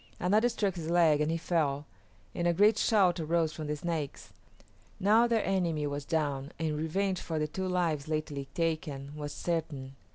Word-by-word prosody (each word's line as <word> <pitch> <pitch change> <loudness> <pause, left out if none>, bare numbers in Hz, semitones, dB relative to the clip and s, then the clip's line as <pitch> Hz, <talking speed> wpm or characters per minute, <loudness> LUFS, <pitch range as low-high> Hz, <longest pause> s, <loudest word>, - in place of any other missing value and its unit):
Another 210 +7 +3
struck 200 -5 0
his 165 -1 -4
leg, 165 -4 +4
and 150 - +1
he 165 - 0
fell, 150 -4 0 0.5
and 175 -1 0
a 170 - +3
great 210 +4 +5
shout 190 -6 +3
arose 160 0 +1
from 155 -2 -5
the 150 - -1
Snakes. 155 -2 -4 0.7
Now 220 +5 +5
their 230 -2 +1
enemy 170 -6 0
was 145 0 -3
down 145 -3 -1
and 160 -2 -1
revenge 185 +5 -1
for 160 - -3
the 150 0 0
two 190 +5 -3
lives 170 -6 0
lately 155 -3 -3
taken 150 -4 -2
was 145 -1 -5
certain. 145 -5 -3
160 Hz, 175 wpm, -30 LUFS, 150-180 Hz, 0.7 s, great